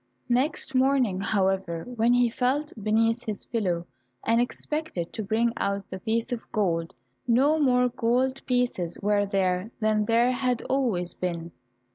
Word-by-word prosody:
Next 260 +3 0
morning, 255 -7 +2
however, 190 -5 0
when 240 -1 +1
he 245 0 +4
felt 265 +6 -1
beneath 225 +2 +2
his 210 -3 -5
pillow, 180 -7 -1 0.4
and 230 +1 +3
expected 250 - -3
to 220 - -3
bring 230 +3 +1
out 200 -1 -2
the 190 - -5
piece 225 +4 -1
of 240 -2 -2
gold, 170 -6 -1 0.3
no 275 +7 +4
more 250 -3 +4
gold 255 +2 0
pieces 245 -9 0
were 205 0 +2
there 190 0 0
than 215 -1 +2
there 235 +3 +3
had 250 -1 -1
always 220 -11 0
been. 170 -2 -4
230 Hz, 145 wpm, -26 LUFS, 195-250 Hz, 0.4 s, he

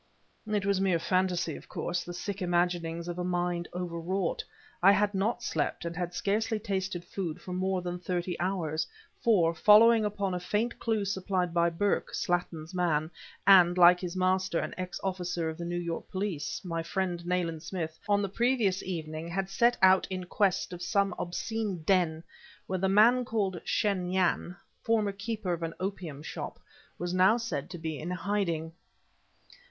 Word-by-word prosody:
It 210 -2 0
was 200 -1 +2
mere 190 -3 +3
phantasy, 180 -1 0
of - - -12
course, 180 0 -2
the 175 - -7
sick 200 +3 -5
imaginings 175 -1 0
of 175 0 -4
a - - -1
mind 175 -1 -1
overwrought. 180 +1 -2 0.4
I 195 +3 +7
had 205 0 +2
not 220 +5 0
slept 210 - -2
and 170 0 -4
had 175 0 -3
scarcely 220 +1 0
tasted 190 -4 -3
food 180 -4 -4
for 180 +1 -7
more 185 0 -1
than 180 0 -4
thirty 180 0 -2
hours; 175 -4 -1 0.4
for, 180 -8 +4
following 220 +5 +6
up 210 -1 -3
a 190 -3 0
faint 210 +6 -1
clue 220 -3 0
supplied 190 -2 -1
by 170 0 +3
Burke, 200 +4 -1
Slattin's 175 -1 -2
man, 165 -3 0 0.3
and, 185 -2 +7
like 180 0 +8
his 180 -1 -5
master, 185 -1 +1
an - - -2
ex 185 0 -5
officer 180 -3 -2
of 160 - -11
New 175 0 -3
York 170 -1 -4
Police, 190 -4 -3
my 165 -2 -2
friend, 175 0 -2
Nayland 175 -3 -1
Smith, 160 -1 -5
on 205 0 +3
the - - 0
previous 225 -2 +1
evening 160 -3 -5
had 190 +3 -2
set 235 +4 +3
out 190 0 +6
in 185 -1 -3
quest 185 0 0
of 175 - -7
some 200 +2 +1
obscene 195 0 -3
den 165 -3 +2 0.4
where 185 0 -2
the 190 +1 +1
man 230 +6 +5
called 200 -7 -1
Shen 190 -4 0
Yan 180 -1 +1 0.3
former 220 -3 +1
keeper 200 -1 -3
of 170 - -4
an 165 0 -4
opium 180 -7 -4
shop - - -6 0.4
was 175 0 -3
now 190 +5 +5
said 225 - -4
to 175 - -7
be 160 -2 -4
in 165 - -5
hiding. 180 -3 -1
180 Hz, 170 wpm, -29 LUFS, 170-200 Hz, 0.4 s, like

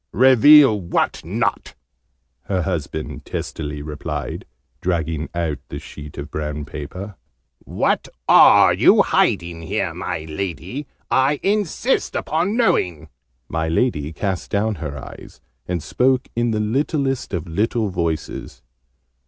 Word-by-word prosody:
"Reveal 130 -2 +7
what 85 - -1
not?" - - -2 0.7
her 95 -3 -1
husband 80 -1 -4
testily 75 -2 -5
replied, 75 -1 -5 0.4
dragging 80 -3 -1
out 80 -5 -1
the - - -5
sheet 75 -1 -10
of 75 +1 -7
brown 75 -1 -4
paper. 90 +7 -7 0.5
"What - - 0 0.2
are - - +7
you - - +5
hiding 85 -1 +1
here, 80 - -2
my 80 - -4
Lady? 100 - -5 0.2
I 135 +2 +3
insist 210 +5 0
upon 175 +8 0
knowing!" 85 - +1 0.4
My 80 +3 -2
Lady 80 - 0
cast 95 +2 -3
down 105 +2 0
her 75 -2 -4
eyes, - - -11 0.3
and 90 -4 -2
spoke 130 +8 +1
in 120 0 +1
the 110 -1 0
littlest 135 +4 -1
of 85 -3 -3
little 105 +5 0
voices. 85 -4 -4
90 Hz, 120 wpm, -21 LUFS, 80-125 Hz, 0.7 s, Reveal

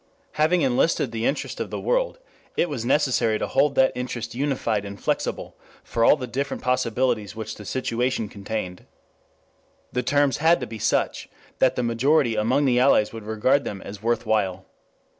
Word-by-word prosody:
Having 160 +2 +2
enlisted 130 0 +1
the 115 0 -1
interest 140 - -3
of - - -3
the - - -4
world, - - 0 0.4
it 175 - +2
was 135 -6 -3
necessary 125 -4 +2
to - - -2
hold 140 0 +2
that 130 0 +4
interest 120 -2 -5
unified 120 -5 -1
and 100 0 -8
flexible - - -2 0.3
for 115 - -1
all - - +7
the 135 -4 -5
different 135 +4 -4
possibilities 125 -5 0
which 110 -1 -5
the 105 - -11
situation 125 -1 -1
contained. 100 -3 -6 1.1
The 125 - +1
terms 145 0 +2
had 165 +3 +4
to 125 - -4
be 110 -1 -8
such - - 0 0.3
that 130 - +3
the 125 - -1
majority 120 +2 +2
among 120 +7 +2
the 125 -2 +3
Allies 125 -5 +4
would 110 -2 -8
regard 120 +6 +2
them 100 - -5
as 100 0 -9
worth 115 +1 0
while. 95 -4 0
125 Hz, 175 wpm, -24 LUFS, 110-140 Hz, 1.1 s, all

